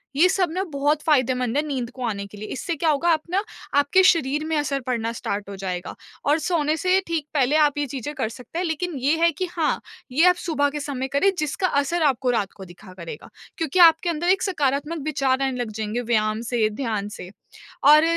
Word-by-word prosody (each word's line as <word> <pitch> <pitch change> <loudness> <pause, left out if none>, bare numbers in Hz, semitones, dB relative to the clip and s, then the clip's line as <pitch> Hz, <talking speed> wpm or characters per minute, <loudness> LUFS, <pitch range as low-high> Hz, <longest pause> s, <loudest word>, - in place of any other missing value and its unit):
ये 325 +6 +6
सब 365 -3 +1
ना 370 +3 -1
बहुत 290 +2 +1
फ़ायदेमंद 255 -4 +1
है, - - +4
नींद 255 -5 -3
को 255 0 -8
आने 200 -3 -3
के 205 - -13
लिए। 215 +1 -7
इससे 335 +6 -3
क्या 320 +2 +1
होगा 310 +3 +2
आप 320 -2 +3
ना 385 +3 +1 0.4
आपके 285 +7 +4
शरीर 305 -5 +3
में 320 0 -1
असर 280 -2 0
पड़ना 230 -2 -1
स्टार्ट 200 0 -4
हो 200 - -6
जाएगा 185 -2 -5 0.3
और 295 +3 +3
सोने 310 -4 +1
से 370 +4 +3
ठीक 330 -3 -2
पहले 280 0 +2
आप 300 -2 +3
ये 290 - 0
चीज़ें 270 +2 -5
कर 260 -7 -1
सकते 250 +8 -7
हैं, 365 - -1
लेकिन 330 +1 -2
ये 280 +5 +2
है 335 0 +5
कि 350 +4 -3
हाँ, 325 -4 0 0.3
ये 305 +7 +4
आप 360 - +3
सुबह 310 -5 0
के 295 +1 -5
समय 275 -2 -3
करें 340 +8 +4
जिसका 305 +4 0
असर 300 +3 0
आपको 265 -3 +2
रात 205 -5 -1
को 195 - -10
दिखा 185 +2 -14
करेगा। 170 -3 -9 0.3
क्योंकि 325 +1 -1
आपके 335 0 +6
अंदर 340 +2 -1
एक 375 0 +3
सकारात्मक 300 -2 -1
विचार 275 -3 +1
आने 265 -2 -1
लग 240 -3 -3
जाएँगे 215 +2 -3
व्यायाम 215 -2 0
से, 230 -2 0
ध्यान 215 -3 -3
से, 180 -3 -9 0.5
और 300 +2 +8
285 Hz, 220 wpm, -23 LUFS, 240-320 Hz, 0.5 s, और